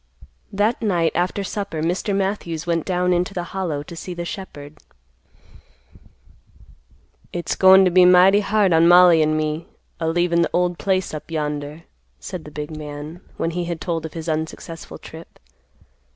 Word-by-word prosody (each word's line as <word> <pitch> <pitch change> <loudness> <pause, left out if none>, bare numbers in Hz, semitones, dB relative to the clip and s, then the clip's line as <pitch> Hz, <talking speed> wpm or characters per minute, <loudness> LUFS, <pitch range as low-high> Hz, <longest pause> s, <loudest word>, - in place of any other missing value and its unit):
That 210 +4 0
night 175 -7 +1
after 180 +3 -1
supper 195 -5 -4
Mr. 185 +4 -1
Matthews 190 -5 -2
went 165 -2 -1
down 180 -1 +1
into 180 +2 -1
the 175 - -2
Hollow 170 -7 -3
to 170 +3 -10
see 180 +2 -7
the 170 0 -5
shepherd. 150 -6 -9 2.5
"It's 175 -1 -3
goin' 190 0 +7
to 180 - +2
be 180 +1 +6
mighty 180 +3 +6
hard 205 -2 +2
on 165 +1 +5
Mollie 175 -2 +7
and 155 0 +1
me 155 +1 -2 0.3
a 165 - -2
leavin' 170 +1 +1
the 170 - +1
old 180 -1 0
place 190 -3 -1
up 155 - -7
yonder," 150 0 -4 0.4
said 160 - -7
the - - -9
big 150 +1 -6
man, 150 +3 -8 0.2
when 165 - -1
he 175 +1 -3
had 170 -1 -4
told 165 -2 -3
of - - -16
his 165 -1 -7
unsuccessful 160 +1 -5
trip. 160 +1 -13
170 Hz, 165 wpm, -21 LUFS, 160-185 Hz, 2.5 s, goin